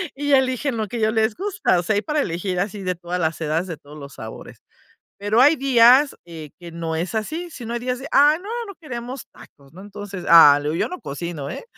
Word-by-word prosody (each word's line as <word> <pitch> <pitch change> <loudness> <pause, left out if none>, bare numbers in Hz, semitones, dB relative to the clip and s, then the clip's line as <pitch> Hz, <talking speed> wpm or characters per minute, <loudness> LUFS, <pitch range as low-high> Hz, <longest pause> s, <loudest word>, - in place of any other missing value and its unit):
y 290 0 -1
eligen 260 -1 +1
lo 215 -1 -2
que 235 +3 -5
ya 215 0 +2
les 220 0 +1
gusta, 395 - 0
o - - -3
sea, 215 +4 0
hay 205 - +1
para 300 -1 0
elegir 180 0 -3
así 200 0 -3
de 180 0 -1
todas 175 +1 -5
las 165 0 -2
edades 160 +3 -1
de 165 -4 -6
todos 150 +2 -14
los 140 -1 -10
sabores. 110 0 -10 0.6
Pero 205 +3 +1
hay 295 +4 +6
días, 260 +1 +5
eh, 160 -3 -10
que 170 -1 -10
no 165 -1 -4
es 175 +5 -3
así, 320 +11 -3
sino 235 -4 -7
hay 240 - -2
días 250 +1 -3
de: 270 - -7
"Ah, 290 +2 +5
no, 405 - -9 0.2
no 400 - -9
queremos 250 -2 -7
tacos", 140 -1 -18
¿no? 185 - -13
Entonces, 205 -2 -8
ah, 145 -4 +8
le 150 - -2
digo: - - -3
"Yo - - -1
no 365 - -7
cocino, 145 -1 -6
¿eh?", - - -7
205 Hz, 240 wpm, -21 LUFS, 170-260 Hz, 0.6 s, ah